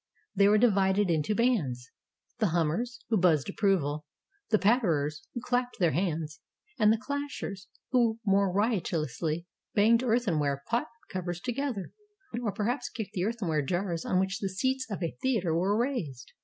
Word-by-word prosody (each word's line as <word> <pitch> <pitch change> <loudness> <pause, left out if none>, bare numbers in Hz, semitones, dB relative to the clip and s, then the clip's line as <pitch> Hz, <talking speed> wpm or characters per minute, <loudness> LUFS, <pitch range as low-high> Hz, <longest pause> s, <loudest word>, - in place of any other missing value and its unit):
They 200 +1 +5
were 210 +1 +5
divided 200 -4 +3
into 160 +6 +1
bands: 155 - 0 0.5
the 215 - +3
Hum 165 -2 +1
mers, 235 +8 -3
who 225 - +3
buzzed 170 -4 +3
approval, 155 -8 0 0.4
the 215 - +4
Patterers, 170 - +1
who 240 - -3
clapped 245 0 -1
their 175 -6 +3
hands, 165 -1 -2 0.4
and 215 -1 +6
the 225 - +3
Clashers, 255 -7 -5 0.2
who 235 -3 +3
more 195 -1 +3
riotously 170 - -1 0.3
banged 225 +3 +5
earthenware 165 - +1
pot 235 +1 0 0.2
covers 175 -2 -3
together, 245 -3 -3 0.5
or 220 -4 -1
perhaps 245 +5 -2
kicked 220 -4 -6
the 180 0 -1
earthenware 195 -9 0
jars 175 +2 -2
on 185 - +1
which 190 +1 -1
the 195 - -2
seats 260 +6 -1
at 195 -4 -4
a 165 - -2
theater 220 -11 +1
were 190 +5 +2
raised. 195 - -2
195 Hz, 155 wpm, -29 LUFS, 165-230 Hz, 0.5 s, and